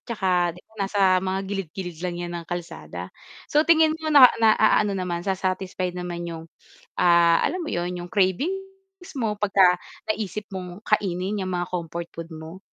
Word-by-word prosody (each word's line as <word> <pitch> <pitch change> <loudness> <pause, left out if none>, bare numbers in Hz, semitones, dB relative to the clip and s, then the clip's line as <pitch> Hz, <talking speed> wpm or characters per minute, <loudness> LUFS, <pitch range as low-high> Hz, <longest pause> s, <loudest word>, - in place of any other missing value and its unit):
tsaka, 210 -5 -2 0.3
'di - - -13
ba, - - -33 0.2
nasa 200 0 -1 0.2
mga 190 0 -2
gilid-gilid 190 -3 -5
lang 180 -1 -3
'yan 175 0 -5
ng 165 - -14
kalsada. 90 - -6 0.4
So, 300 +1 +4
tingin 320 -1 +5
mo 315 - -3
na 285 -4 +9 0.2
na-aano 215 -1 +4
naman 180 -2 -2
sa-satisfied 185 -1 -2
naman 175 -1 -5
yung, 165 -1 -6 0.6
ah, 170 -1 +5
alam 365 -1 -1
mo 315 - -5
'yun, 175 +1 -2
'yung 175 0 -7
cravings 385 - -2
mo 220 -5 -2
'pagka 190 -3 +4 0.3
naisip 215 -1 -4
mong 185 +1 -7
kainin 195 -1 0
yang 185 - -4
mga 175 -1 -1
comfort 170 -1 -4
food 165 0 -8
mo. 160 +4 -9
185 Hz, 165 wpm, -24 LUFS, 175-215 Hz, 0.6 s, na